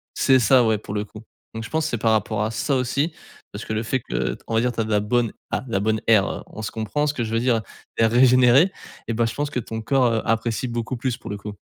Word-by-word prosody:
c'est 130 -1 +4
ça, 125 +2 +5
ouais 110 -1 +2
pour 100 - -8
le 105 0 -1
coup. 105 +1 -12 0.3
Donc 115 - -4
je - - -9
pense 160 0 0
que - - -1
c'est 120 - -1
par 115 0 +2
rapport 110 0 0
à 110 - -2
ça 135 +5 -1
aussi. 140 +6 -1 0.4
Parce 100 - -7
que - - -4
le 110 +1 -1
fait 130 +4 -1
que - - -2
t - - -21
on - - -4
va 110 - +3
dire 125 +1 +1
tu 120 - -7
as - - +1
de - - -7
la 105 -1 +3
bonne 115 +1 0 0.2
ah, - - -2
la 105 -5 0
bonne 110 +1 +1
air 105 -4 +3
on 110 - -9
se - - -4
comprend, 115 +7 -2
ce 145 - 0
que 125 - -2
je 110 - -5
veux 115 - +2
dire, 120 -2 +2 0.4
l'air 115 0 +4
régénéré 125 +6 +5 0.4
et - - 0
bah, 115 +1 +1
je 115 - -3
pense 145 0 -2
que 125 - -1
ton 110 0 -6
corps, 130 +3 +2
heu, 110 - 0
apprécie 115 +2 0
beaucoup 120 +1 -3
plus 125 0 -2
pour - - -10
le 100 - -3
coup. 105 +1 -7
115 Hz, 300 wpm, -23 LUFS, 110-125 Hz, 0.4 s, ça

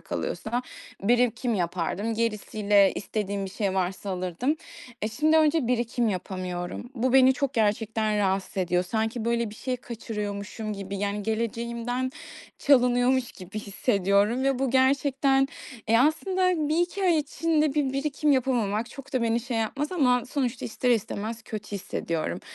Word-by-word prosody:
kalıyorsa 245 - -3 0.4
birikim 240 +1 +2
yapardım, 185 +5 -1
gerisiyle 210 -3 +2
istediğim 200 -2 -3
bir 190 - -6
şey 195 -1 -1
varsa 190 +1 -2
alırdım. 185 - -1 0.5
E, 215 - +1
şimdi 305 +7 +2
önce 310 -4 +3
birikim 240 -1 +1
yapamıyorum. 185 +3 -4
Bu 255 +1 0
beni 265 0 +7
çok 280 0 -2
gerçekten 215 0 +1
rahatsız 195 -1 0
ediyor. 180 -1 +1
Sanki, 220 +4 -2
böyle, 235 -2 0
bir - - -10
şey 255 +3 -3
kaçırıyormuşum 210 -2 -5
gibi, 195 0 -5
yani, 205 +1 -2
geleceğimden 235 +3 -2 0.5
çalınıyormuş 250 -1 +3
gibi 190 +3 -8
hissediyorum 205 +2 +1
ve 270 -2 +2
bu 265 -2 0
gerçekten 265 +1 +4 0.9
Eee, 230 +1 +5
aslında 335 +3 +2
1-2 350 +5 0
ay 350 -4 +4
içinde 305 0 +1
bir 285 -3 +1
birikim 285 +1 +1
yapamamak 235 -4 0
çok 275 0 -11
da 255 -2 +1
beni 230 +1 +1
şey 240 -1 -4
yapmaz 275 +8 -2
ama 250 -8 +3
sonuçta 255 -3 -2
ister 245 +2 -1
istemez 220 0 -1
kötü 215 -2 -7
hissediyorum. 170 -4 -3
230 Hz, 140 wpm, -26 LUFS, 205-260 Hz, 0.9 s, beni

